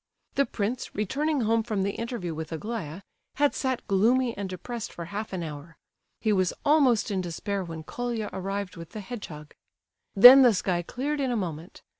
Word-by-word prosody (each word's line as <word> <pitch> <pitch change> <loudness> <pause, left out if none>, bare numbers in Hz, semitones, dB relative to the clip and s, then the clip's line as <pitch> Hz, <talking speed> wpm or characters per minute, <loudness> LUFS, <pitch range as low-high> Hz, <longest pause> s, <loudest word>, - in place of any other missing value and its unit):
The 280 - +2
prince, 230 +3 -3
returning 280 +8 0
home 225 0 +2
from 215 -3 -2
the 200 - 0
interview 230 -7 -4
with 160 0 -6
Aglaya, 185 -1 -5 0.3
had 290 0 +2
sat 260 -2 -2
gloomy 235 +5 +2
and 195 -1 -4
depressed 230 +6 -6
for 170 - -7
half 205 +5 -5
an 185 -3 -3
hour. 155 +1 -8 0.4
He 215 -1 +1
was 185 -2 +1
almost 270 -8 +3
in 190 -2 0
despair 190 +3 -3
when 165 -2 -7
Colia 235 +3 -3
arrived 195 0 -4
with 165 -1 -10
the 215 - -5
hedgehog. 170 -9 -8 0.6
Then 245 +7 +11
the 245 -5 +6
sky 180 -2 0
cleared 280 - -3
in 265 - 0
a 240 - 0
moment. 170 -3 -6
205 Hz, 180 wpm, -27 LUFS, 180-240 Hz, 0.6 s, Then